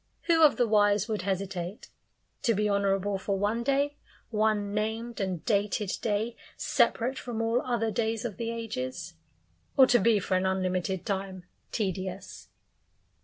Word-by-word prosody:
Who 330 Hz, -2 st, +3 dB
of 300 Hz, -, +6 dB
the 245 Hz, -, +3 dB
wise 205 Hz, -1 st, +3 dB
would 215 Hz, -3 st, -2 dB
hesitate? 190 Hz, 0 st, -4 dB, 0.5 s
To 230 Hz, -3 st, +2 dB
be 210 Hz, +1 st, +1 dB
honourable 200 Hz, -1 st, +1 dB
for 195 Hz, +1 st, -1 dB
one 210 Hz, +4 st, 0 dB
day 280 Hz, +3 st, +1 dB, 0.3 s
one 210 Hz, -2 st, +1 dB
named 225 Hz, +3 st, -2 dB
and 185 Hz, -4 st, -3 dB
dated 205 Hz, -1 st, +1 dB
day, 220 Hz, +2 st, -1 dB, 0.2 s
separate 255 Hz, +3 st, +1 dB
from 240 Hz, -3 st, -5 dB
all 225 Hz, +2 st, +1 dB
other 235 Hz, -3 st, -1 dB
days 225 Hz, 0 st, -1 dB
of 210 Hz, -6 st, -4 dB
the 230 Hz, -1 st, -3 dB
ages 175 Hz, -, -4 dB, 0.6 s
or 265 Hz, -, +9 dB
to 245 Hz, -1 st, +4 dB
be 220 Hz, +1 st, +4 dB
for 190 Hz, -1 st, 0 dB
an 185 Hz, +1 st, +2 dB
unlimited 185 Hz, 0 st, -1 dB
time 190 Hz, -3 st, -3 dB, 0.3 s
tedious? 190 Hz, -2 st, -4 dB
210 Hz, 150 wpm, -28 LUFS, 190-230 Hz, 0.6 s, or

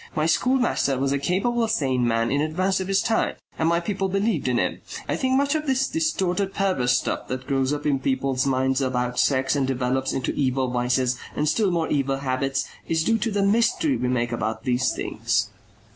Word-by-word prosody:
My 155 Hz, -, +1 dB
schoolmaster 240 Hz, -, +1 dB
was 135 Hz, +1 st, 0 dB
a 140 Hz, -, +1 dB
capable 225 Hz, -, 0 dB
sane 130 Hz, -, +1 dB
man 115 Hz, 0 st, +1 dB
in 140 Hz, +1 st, +1 dB
advance 185 Hz, +5 st, 0 dB
of 190 Hz, -, -3 dB
his 195 Hz, 0 st, +2 dB
times 225 Hz, -, 0 dB, 0.2 s
and 160 Hz, 0 st, +2 dB
my 170 Hz, 0 st, +2 dB
people 195 Hz, +1 st, -2 dB
believed 195 Hz, -, 0 dB
in 125 Hz, -1 st, +1 dB
him. -, -, -1 dB, 0.3 s
I -, -, 0 dB
think 260 Hz, -1 st, 0 dB
much 280 Hz, +1 st, +2 dB
of 310 Hz, -1 st, -2 dB
this 265 Hz, 0 st, +2 dB
distorted 195 Hz, -, -1 dB
perverse 130 Hz, -11 st, +2 dB
stuff -, -, -3 dB
that 130 Hz, 0 st, -4 dB
grows 135 Hz, -1 st, 0 dB
up 145 Hz, 0 st, -3 dB
in 140 Hz, -3 st, +2 dB
people's 135 Hz, 0 st, 0 dB
minds 130 Hz, 0 st, +1 dB
about 125 Hz, -1 st, -1 dB
sex 135 Hz, 0 st, +2 dB
and 135 Hz, -2 st, +1 dB
develops 130 Hz, 0 st, -1 dB
into 130 Hz, -, -2 dB
evil 130 Hz, -2 st, 0 dB
vices 125 Hz, 0 st, 0 dB, 0.2 s
and 150 Hz, -, 0 dB
still 195 Hz, +7 st, +2 dB
more 170 Hz, -2 st, 0 dB
evil 135 Hz, -1 st, 0 dB
habits, 135 Hz, 0 st, -1 dB, 0.2 s
is 160 Hz, -1 st, +1 dB
due 225 Hz, +5 st, +2 dB
to 235 Hz, -, 0 dB
the 200 Hz, -2 st, 0 dB
mystery 235 Hz, -, +2 dB
we 125 Hz, -, -1 dB
make 120 Hz, -1 st, 0 dB
about 110 Hz, -1 st, -3 dB
these 130 Hz, -1 st, +1 dB
things." -, -, -1 dB
140 Hz, 205 wpm, -24 LUFS, 130-195 Hz, 0.3 s, his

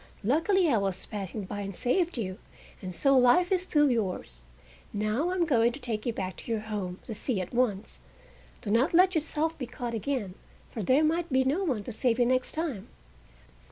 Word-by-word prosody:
Luckily 330 Hz, -, +3 dB
I 240 Hz, -8 st, +3 dB
was 195 Hz, -2 st, -2 dB
passing 205 Hz, 0 st, -5 dB
by 200 Hz, +2 st, -6 dB
and 195 Hz, -1 st, -5 dB
saved 335 Hz, -, 0 dB
you, 185 Hz, -5 st, -4 dB, 0.4 s
and 185 Hz, -2 st, -6 dB
so 275 Hz, +6 st, +3 dB
life 260 Hz, +9 st, +5 dB
is 370 Hz, -2 st, +3 dB
still 295 Hz, -6 st, +3 dB
yours. 185 Hz, -, -3 dB, 0.5 s
Now 215 Hz, +10 st, 0 dB
I 365 Hz, -, -1 dB
am 350 Hz, -2 st, +2 dB
going 240 Hz, -6 st, +3 dB
to 275 Hz, -, -8 dB
take 230 Hz, -4 st, -3 dB
you -, -, +2 dB
back 185 Hz, -4 st, -5 dB
to -, -, -7 dB
your 220 Hz, -2 st, 0 dB
home, 205 Hz, -4 st, -4 dB
the 225 Hz, -, -5 dB
sea, 215 Hz, 0 st, -2 dB
at 185 Hz, +3 st, -5 dB
once. 230 Hz, -5 st, -1 dB, 0.6 s
Do 205 Hz, -, -3 dB
not 255 Hz, +10 st, +3 dB
let 370 Hz, +2 st, +6 dB
yourself 320 Hz, 0 st, -1 dB
be 255 Hz, -, -4 dB
caught 240 Hz, -1 st, -5 dB
again, 225 Hz, -3 st, -2 dB, 0.4 s
for 225 Hz, -, -4 dB
there 260 Hz, -, +3 dB
might 330 Hz, +1 st, 0 dB
be 260 Hz, 0 st, +4 dB
no 290 Hz, +9 st, 0 dB
one 255 Hz, -, -1 dB
to 240 Hz, -, -6 dB
save 235 Hz, +1 st, +1 dB
you 245 Hz, -, +3 dB
next 255 Hz, +1 st, 0 dB
time!" 310 Hz, -, -3 dB
245 Hz, 205 wpm, -28 LUFS, 210-305 Hz, 0.6 s, let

